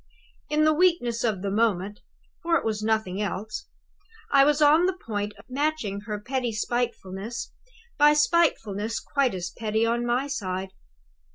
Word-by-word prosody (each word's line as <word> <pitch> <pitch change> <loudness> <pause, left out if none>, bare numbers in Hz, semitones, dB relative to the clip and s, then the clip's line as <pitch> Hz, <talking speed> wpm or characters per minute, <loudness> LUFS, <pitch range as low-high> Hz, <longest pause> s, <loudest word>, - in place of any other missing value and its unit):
"In 300 +1 +2
the 310 0 +5
weakness 305 -9 +2
of 210 -5 -1
the 200 - -1
moment 205 -2 0 0.4
(for 335 0 +1
it - - -5
was 215 -1 -1
nothing 215 -3 0
else), 210 - -4 0.6
I 275 -1 +7
was 295 +1 +3
on 310 +4 +5
the 375 0 -1
point 205 -2 -2
of - - -16
matching 265 -7 -1
her 210 -1 -3
petty 245 +2 -2
spitefulness 225 -2 -3 0.5
by 295 0 +7
spitefulness 230 - +1
quite 275 -7 0
as 180 -1 -4
petty 220 +1 -1
on 235 +1 0
my 240 +3 0
side. 190 -9 -3
230 Hz, 155 wpm, -26 LUFS, 205-290 Hz, 0.6 s, I